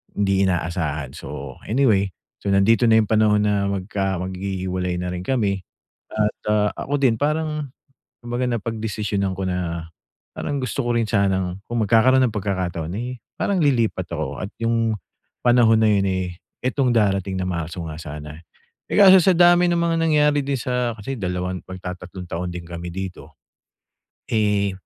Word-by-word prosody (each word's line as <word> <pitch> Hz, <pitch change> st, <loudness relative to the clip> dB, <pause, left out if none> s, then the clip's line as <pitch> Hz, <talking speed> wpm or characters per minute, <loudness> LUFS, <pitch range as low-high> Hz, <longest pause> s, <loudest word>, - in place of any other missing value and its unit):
hindi 100 Hz, -1 st, +2 dB
inaasahan. 80 Hz, -6 st, -2 dB
So, 70 Hz, -2 st, -7 dB
anyway. 110 Hz, -6 st, +2 dB, 0.3 s
So, 100 Hz, -, 0 dB
nandito 110 Hz, +5 st, +4 dB
na 110 Hz, -1 st, +6 dB
yung 105 Hz, -, -3 dB
panahon 110 Hz, -1 st, +4 dB
na 100 Hz, -1 st, +1 dB
magka 95 Hz, -1 st, -2 dB
maghihiwalay 95 Hz, -1 st, -3 dB
na 90 Hz, -, -3 dB
rin 90 Hz, 0 st, -5 dB
kami 100 Hz, -7 st, 0 dB, 0.5 s
at, 105 Hz, -1 st, 0 dB
ah, 105 Hz, -1 st, +3 dB
ako 145 Hz, -, -2 dB
din 120 Hz, -4 st, +4 dB
parang 150 Hz, -2 st, -1 dB, 0.5 s
kumbaga, 120 Hz, +1 st, -1 dB
napagdesisyonan 105 Hz, -4 st, -2 dB
ko 95 Hz, -, -2 dB
na 85 Hz, -2 st, -2 dB, 0.5 s
parang 145 Hz, -, -3 dB
gusto 130 Hz, +2 st, -2 dB
ko 120 Hz, 0 st, +1 dB
rin 115 Hz, -, +1 dB
sanang 95 Hz, -3 st, 0 dB
kung 120 Hz, -2 st, 0 dB
magkakaroon 130 Hz, +5 st, +5 dB
ng 110 Hz, -, -5 dB
pagkakataon 90 Hz, -4 st, -2 dB
ay 125 Hz, +2 st, -5 dB, 0.2 s
parang 195 Hz, -3 st, +1 dB
lilipat 115 Hz, -, +1 dB
ako 75 Hz, -4 st, -3 dB
at 100 Hz, -, -4 dB
yung 115 Hz, -1 st, +1 dB, 0.5 s
panahon 120 Hz, -2 st, +5 dB
na 110 Hz, -, +4 dB
yun, 100 Hz, -1 st, +2 dB
eh, 95 Hz, -1 st, -1 dB, 0.4 s
itong 130 Hz, 0 st, +1 dB
darating 95 Hz, -3 st, +1 dB
na 90 Hz, -, -1 dB
Marso 85 Hz, 0 st, -4 dB
nga 75 Hz, -, -7 dB
sana. 75 Hz, +1 st, -8 dB, 0.5 s
Eh, -, -, 0 dB
kaso 190 Hz, -2 st, +9 dB
sa 190 Hz, -, +5 dB
dami 175 Hz, 0 st, +6 dB
ng 175 Hz, -, +2 dB
mga 170 Hz, -1 st, +1 dB
nangyari 150 Hz, -2 st, +3 dB
din 140 Hz, 0 st, -1 dB
sa 125 Hz, -2 st, -1 dB
kasi 130 Hz, +6 st, -5 dB
dalawang 90 Hz, 0 st, -2 dB
magtatatlong 90 Hz, 0 st, -7 dB
taon 90 Hz, +2 st, -3 dB
din 85 Hz, -1 st, -7 dB
kami 85 Hz, 0 st, -6 dB
dito. 95 Hz, -1 st, -7 dB, 0.9 s
Eh, 105 Hz, -3 st, +2 dB
100 Hz, 160 wpm, -22 LUFS, 90-120 Hz, 0.9 s, kaso